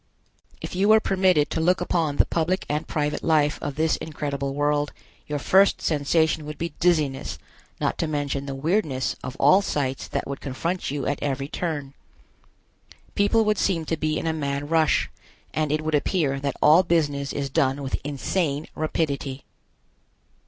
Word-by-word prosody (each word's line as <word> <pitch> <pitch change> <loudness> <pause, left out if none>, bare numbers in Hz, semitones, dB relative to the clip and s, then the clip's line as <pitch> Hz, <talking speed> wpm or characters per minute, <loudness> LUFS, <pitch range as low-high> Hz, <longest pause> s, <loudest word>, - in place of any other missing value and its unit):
If - - -6
you 195 +3 +2
were 220 0 +7
permitted 185 -7 +2
to 160 - -1
look 180 +3 +3
upon 165 -4 0
the - - +5
public 170 +3 -1
and 150 +1 -2
private 150 -1 -2
life 150 -3 +2
of 145 -2 -4
this 160 0 +1
incredible 140 -3 -4
world, 145 0 +1 0.4
your 150 - -2
first 190 +7 +4
sensation 155 +1 +1
would 150 - -6
be 170 -2 -4
dizziness, 155 -6 +1 0.4
not - - -1
to 165 - 0
mention 145 -2 -2
the 135 - -4
weirdness 150 - 0
of 130 0 -5
all 150 +8 +5
sights 135 -8 -2
that - - -3
would 140 0 -6
confront 165 +7 -3
you 140 0 -3
at 145 - -2
every 135 -1 -2
turn. 145 -4 -4 1.2
People 210 +2 +3
would 210 -1 +1
seem 170 -5 +1
to 165 - -1
be 155 0 -1
in - - -3
a 160 - +1
mad 145 -1 -3
rush, 160 -2 +3 0.5
and 155 -2 0
it 155 +1 +1
would 155 0 -2
appear 145 -2 +1
that 140 0 -2
all 155 +4 +7
business 145 -6 0
is 140 -1 -3
done 135 +1 +1
with 135 - -2
insane 145 +1 -1
rapidity. 145 -3 -2
150 Hz, 170 wpm, -24 LUFS, 140-165 Hz, 1.2 s, were